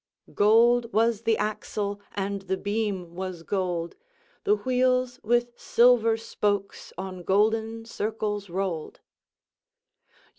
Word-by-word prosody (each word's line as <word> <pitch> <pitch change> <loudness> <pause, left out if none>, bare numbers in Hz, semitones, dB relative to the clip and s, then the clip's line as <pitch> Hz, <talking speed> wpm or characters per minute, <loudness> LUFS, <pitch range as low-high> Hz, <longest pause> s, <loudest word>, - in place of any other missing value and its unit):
"Gold 230 +3 +4
was 225 0 +2
the 225 -1 +2
axle, 205 -1 -3
and 200 0 -2
the 190 0 -2
beam 200 -4 -2
was 185 -2 -5
gold; 175 -3 -2 0.5
The 415 +1 +4
wheels 255 -3 +1
with 240 +2 +1
silver 235 -2 +4
spokes 205 -3 -2
on 185 -1 -6
golden 220 +4 +1
circles 210 -3 -3
roll'd." 175 -3 -3
210 Hz, 105 wpm, -26 LUFS, 195-230 Hz, 0.5 s, Gold